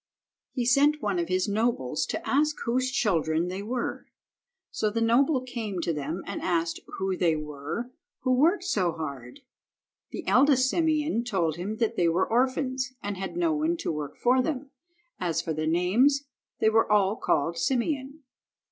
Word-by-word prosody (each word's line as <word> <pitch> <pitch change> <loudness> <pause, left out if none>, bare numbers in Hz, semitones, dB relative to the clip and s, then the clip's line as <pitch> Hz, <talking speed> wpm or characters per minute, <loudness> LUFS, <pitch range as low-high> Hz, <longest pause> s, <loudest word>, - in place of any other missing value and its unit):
He 245 -3 -2
sent 285 +5 +4
one 200 -4 0
of 170 - -1
his 185 +2 0
nobles 205 - 0
to - - -4
ask 300 +2 +2
whose 255 +2 +1
children 175 - +1
they 190 +2 -4
were. 240 +4 -3 0.6
So 215 - 0
the 220 +2 -2
noble 255 +5 +3
came 230 -7 -4
to 165 - -1
them 150 +5 -4
and - - -5
asked 165 -2 0 0.2
who 190 -1 -1
they 170 -3 +2
were 150 - -5 0.3
who 255 - +2
worked 330 +9 +3
so 190 - 0
hard. 140 - -7 0.7
The - - -7
eldest 260 0 +5
Simeon 310 -6 +1
told 175 -9 -1
him 200 +5 -4
that 230 -2 0
they 175 - +3
were 175 +3 +1
orphans 255 +1 0
and 205 0 -3
had 190 - -5
no 335 -2 +2
one 315 +3 0
to 330 - -2
work 150 -2 -5
for 255 +2 +3
them. 275 0 -3 0.5
As 170 -3 0
for 160 - -2
their 155 +1 -2
names 220 - +3 0.3
they 220 - +3
were 225 -1 +3
all 205 -1 +3
called 165 -4 0
Simeon. 270 - -1
220 Hz, 170 wpm, -27 LUFS, 175-265 Hz, 0.7 s, eldest